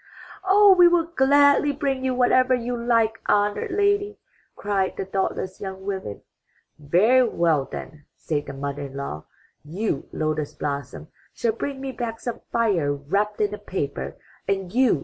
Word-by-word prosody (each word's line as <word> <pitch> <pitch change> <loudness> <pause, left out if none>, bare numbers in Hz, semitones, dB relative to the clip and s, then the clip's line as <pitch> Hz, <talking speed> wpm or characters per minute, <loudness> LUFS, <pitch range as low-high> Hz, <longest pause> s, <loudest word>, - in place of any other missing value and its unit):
'* - - -17
''Oh, 390 +1 +6
we 355 -1 +7
will 345 -1 +3
gladly 285 -2 +4
bring 275 -2 -2
you 260 -1 0
whatever 255 +1 +4
you 245 0 -3
like, 230 -2 +1
honored 205 - +1
lady!" 405 +1 +1 0.4
cried 200 -2 -1
the 195 - -3
thoughtless 190 -1 -3
young 190 -1 -7
women. 190 - -5 0.6
''Very 220 - +3
well 160 -5 +2
then,'' 145 0 -8
said 150 -2 -3
the - - -6
mother 140 +1 -5
in 135 - -13
law, 110 - -5 0.4
''you, 165 0 -3
Lotus 155 -1 -2
blossom, 140 - -5 0.3
shall 230 - +1
bring 270 +4 -4
me 270 -1 -4
back 230 -2 -5
some 240 -2 -5
fire, 200 -11 +1
wrapped 200 +10 -1
in 210 0 +1
a 210 - -6
paper, 140 - -4 0.3
and 195 -2 -2
you. 250 - +3
210 Hz, 160 wpm, -24 LUFS, 155-260 Hz, 0.6 s, we